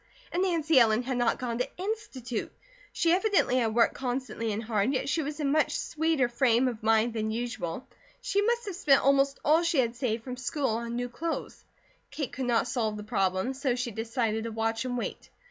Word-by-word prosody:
And 350 - 0
Nancy 325 -6 +3
Ellen 225 0 +4
had 255 0 -2
not 240 -1 +2
gone 235 -2 -3
to 250 - -3
Institute. 315 - -4 0.4
She 335 - +1
evidently 375 - +3
had 225 -3 +1
worked 235 - +4
constantly 250 -3 -3
and 210 +2 -3
hard, 215 +1 +1
yet 260 - -1
she 320 - +1
was 295 +1 -5
in 285 -2 +1
much 310 +1 +2
sweeter 315 -5 +1
frame 240 0 +2
of 235 -3 -4
mind 225 +1 +3
than 220 -1 -2
usual. 230 -4 -4 0.3
She 405 -5 0
must 470 +2 +1
have 395 -4 -5
spent 295 -7 +4
almost 275 0 +3
all 315 +3 +5
she 340 -2 0
had 240 -2 +2
saved 235 -3 -2
from 250 0 -6
her - - -9
school 275 +2 -1
on 235 +1 -2
new 245 0 -2
clothes. 325 +7 -5 0.5
Kate 290 -3 -4
could 260 - -3
not 235 0 +2
solve 220 -4 -1
the 210 - -6
problem, 195 +1 0
so 265 -2 -1
she 245 -1 -3
decided 225 0 -2
to 230 - -4
watch 225 +2 -1
and 245 -1 -2
wait. - - -5
250 Hz, 210 wpm, -28 LUFS, 230-290 Hz, 0.5 s, all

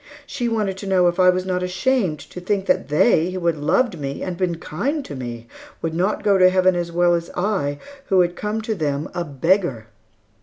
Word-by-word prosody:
She 245 -4 -3
wanted 210 -4 -1
to 200 - -7
know 185 -2 +3
if 175 +2 -1
I 180 0 +6
was 180 0 +1
not 180 -1 -1
ashamed 185 -1 0
to 180 - -8
think 195 +1 -1
that - - +1
they, 155 +3 +3
who 185 -1 -5
had 170 -2 +2
loved 175 - +1
me, 140 -1 -4
and 185 - -3
been 175 -1 -1
kind 275 - -3
to 145 - -7
me 120 -2 -6 0.4
would 165 -1 -1
not 185 +5 0
go 200 -2 +3
to 185 0 +7
Heaven 185 0 +3
as 170 -1 -2
well 175 +1 +3
as 170 0 -1
I 180 -7 0 0.3
who 190 -2 +4
had 175 0 0
come 210 +2 -3
to 220 - -1
them 150 -5 -2
a 175 - -2
beggar? 150 - 0
180 Hz, 220 wpm, -21 LUFS, 165-195 Hz, 0.4 s, to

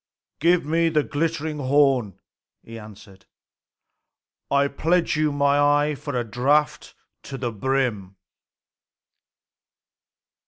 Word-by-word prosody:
"Give 170 0 +2
me 165 +2 +1
the 155 -2 +1
glittering 155 0 -3
horn," 130 -7 +1 0.5
he 115 0 -10
answered. 100 -2 -15 1.2
"I 140 0 +2
pledge 165 +5 0
you 155 0 +1
my 140 0 +1
eye 145 +1 +2
for 145 0 -7
a - - -2
draught 140 +7 -1 0.3
to 135 - -8
the 120 -2 -3
brim." 110 -4 -2
140 Hz, 105 wpm, -23 LUFS, 125-150 Hz, 1.2 s, Give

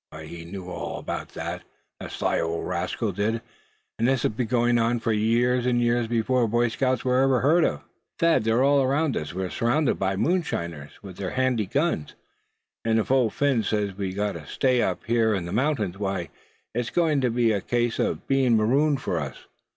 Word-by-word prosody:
He 85 +2 -9
knew 90 +1 -8
all 90 - -5
about - - -5
that, - - -4 0.4
the - - -7
sly - - -1
old 85 0 -2
rascal - - -2
did; 110 +3 -1 0.6
and 115 - +2
this 130 -2 +1
has - - +2
been 115 +2 -2
going 120 0 +2
on 115 +1 +1
for 115 0 0
years 120 +3 +2
and 120 -1 +2
years 120 -1 +1
before 120 +1 +1
Boy 120 +2 +2
Scouts 130 +3 -1
were 125 0 +3
ever 135 -2 +3
heard 160 +5 +4
of." - - 0 0.4
"Thad, 165 -8 +3
they're 115 +3 +2
all 140 0 +4
around 140 +2 +1
us; 75 - -3
we're 95 +1 -4
surrounded 130 +5 +1
by 95 0 0
these 95 - 0
moonshiners, 85 - -2
with 95 -3 -10
their 95 -2 -3
handy 130 -5 0
guns; 140 - -1 0.7
and 115 0 +2
if 110 - 0
Old 130 -5 +3
Phin 140 -5 +2
says 105 -2 -1
we've 95 -1 -4
got 105 0 0
to 80 -5 -9
stay 130 -2 +1
up 90 -2 -1
here 115 -2 +2
in 90 -3 -3
the 85 - -6
mountains, 110 -7 0
why, 95 -4 -2 0.4
it's 120 +1 -2
going 160 -5 +2
to 125 - +2
be 115 -1 +2
a 100 -2 0
case 120 +1 -1
of - - -1
being 130 -4 +3
marooned 135 +6 +2
for 85 - -1
us. 70 -3 -7
115 Hz, 205 wpm, -25 LUFS, 100-130 Hz, 0.7 s, heard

